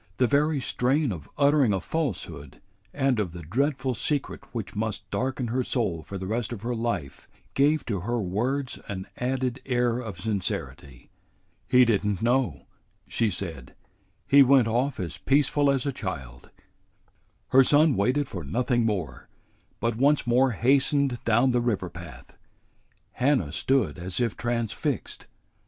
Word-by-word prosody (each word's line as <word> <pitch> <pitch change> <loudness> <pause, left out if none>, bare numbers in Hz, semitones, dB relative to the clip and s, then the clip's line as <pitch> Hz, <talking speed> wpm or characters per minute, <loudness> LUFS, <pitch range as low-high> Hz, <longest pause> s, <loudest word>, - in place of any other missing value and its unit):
The 130 - +4
very 145 +3 +2
strain 130 +2 +1
of 80 -6 -7
uttering 140 -4 +4
a 95 - 0
falsehood 85 - -4 0.3
and 135 -3 +1
of 90 -6 -2
the 85 -1 -8
dreadful 130 - 0
secret 145 +3 -2
which 115 -4 -5
must 105 -1 -3
darken 130 -2 -2
her 125 +2 0
soul 110 -11 -1
for 100 +5 -7
the 95 - -5
rest 110 +3 -2
of 115 -3 -6
her 120 +1 -1
life 115 - -3 0.3
gave 145 +2 +2
to 105 -5 -2
her 120 +7 -2
words 120 +8 -2
an 95 -2 -5
added 130 0 -2
air 120 -2 +1
of 110 -8 -7
sincerity. 90 - -4 0.6
"He 125 0 +6
did 110 -4 +2
n't 105 -2 -1
know," 120 - 0 0.4
she 115 -2 +1
said. 80 -9 -6 0.5
"He 140 0 +7
went 135 -3 +5
off 125 +5 0
as 85 -5 -4
peaceful 145 +1 +2
as 135 -1 +1
a 140 - 0
child." 65 - -6 1.0
Her 135 +1 +7
son 145 +1 +5
waited 130 +8 +1
for 90 -4 -6
nothing 120 - 0
more, 85 - -4 0.5
but 115 -1 -1
once 140 +3 +3
more 125 +2 +3
hastened 135 +2 +2
down 120 +3 +3
the 120 0 +2
river 105 -7 -1
path. 85 -3 -12 0.7
Hannah 125 - +1
stood 125 - 0
as 90 +3 -4
if 120 -3 0
transfixed. 120 -2 -3
120 Hz, 150 wpm, -26 LUFS, 95-135 Hz, 1.0 s, He